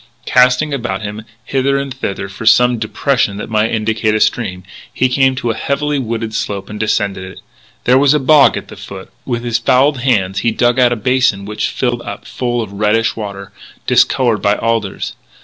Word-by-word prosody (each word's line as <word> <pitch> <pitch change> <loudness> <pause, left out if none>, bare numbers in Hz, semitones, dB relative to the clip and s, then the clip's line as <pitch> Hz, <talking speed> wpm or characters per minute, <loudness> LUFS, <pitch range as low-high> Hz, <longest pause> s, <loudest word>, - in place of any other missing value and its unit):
Casting 125 +4 +3
about 110 -7 -3
him, 105 +1 -6 0.2
hither 135 +1 0
and 140 -1 -3
thither, 100 -6 -4
for 95 +3 -9
some 125 +1 +5
depression 110 -1 0
that 105 - -7
might 110 +1 +2
indicate 110 0 0
a - - +1
stream, 95 -6 0 0.3
he 130 - +1
came 130 +1 +2
to 120 -3 -1
a - - -4
heavily 145 +3 -1
wooded 115 -2 -3
slope, 100 -2 -4
and 105 - -7
descended 100 -3 -1
it. 95 0 -10 0.4
There 125 +2 +4
was 145 +1 +4
a - - +2
bog 145 +2 +5
at - - -8
the - - -10
foot. 95 -1 -10 0.2
With 120 -2 -2
his 120 -1 0
fouled 130 +4 +2
hands 100 -7 +1
he 120 - +1
dug 120 +3 +1
out 125 -1 +4
a - - +1
basin 120 -3 +1
which 105 +1 -2
filled 120 -2 -2
up - - -8
full 120 -2 -2
of 100 -2 -10
reddish 105 +3 +1
water, 100 -3 -7 0.3
discoloured 120 -5 +2
by 100 0 +2
alders. 115 -3 -2
115 Hz, 195 wpm, -16 LUFS, 105-130 Hz, 0.4 s, some